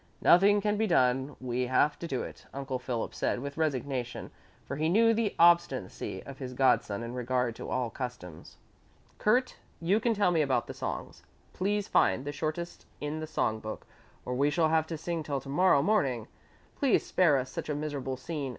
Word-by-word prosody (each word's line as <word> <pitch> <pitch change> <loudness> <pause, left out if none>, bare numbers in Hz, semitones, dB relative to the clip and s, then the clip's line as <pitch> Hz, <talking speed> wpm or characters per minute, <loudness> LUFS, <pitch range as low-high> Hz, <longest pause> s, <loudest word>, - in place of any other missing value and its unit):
"Nothing 200 +3 +6
can 210 0 0
be 220 +1 +1
done, 130 -4 +2
we 125 0 -2
have 145 +4 +2
to 170 - -5
do 130 -5 -2
it," - - -10
Uncle 135 -2 -3
Philip 125 -2 -3
said - - -1
with 140 +2 -6
resignation, 135 -5 -2 0.3
for 140 - -5
he 155 +2 +1
knew 230 +5 +5
the 220 -2 0
obstinacy 165 - +2
of 135 -1 -10
his 130 -2 -6
godson 115 -5 +2
in 115 +1 -6
regard 125 -1 -1
to - - -7
all 125 -3 -1
customs. 120 - -7 0.6
"Kurt, 250 +5 +2 0.2
you 185 +6 +2
can 230 0 +1
tell 200 -3 +3
me 165 -2 +2
about 135 -3 +1
the - - -7
songs; - - -5 0.3
please 205 +2 -1
find 135 - +2
the 145 - -2
shortest 155 +4 -4
in 150 +1 -3
the 155 - -5
song 110 -8 -1
book, 110 0 -7 0.4
or 125 - -3
we 140 +3 +2
shall 160 +1 +2
have 160 0 +2
to 165 - -4
sing 165 +1 -3
till 145 -3 -2
to 135 - -11
morrow 145 -1 +4
morning. 135 - +1 0.5
Please 275 -4 +2
spare 165 -6 +3
us 130 0 -3
such - - -5
a 150 - 0
miserable 145 -3 -3
scene. 145 0 -4
145 Hz, 195 wpm, -29 LUFS, 130-170 Hz, 0.6 s, Nothing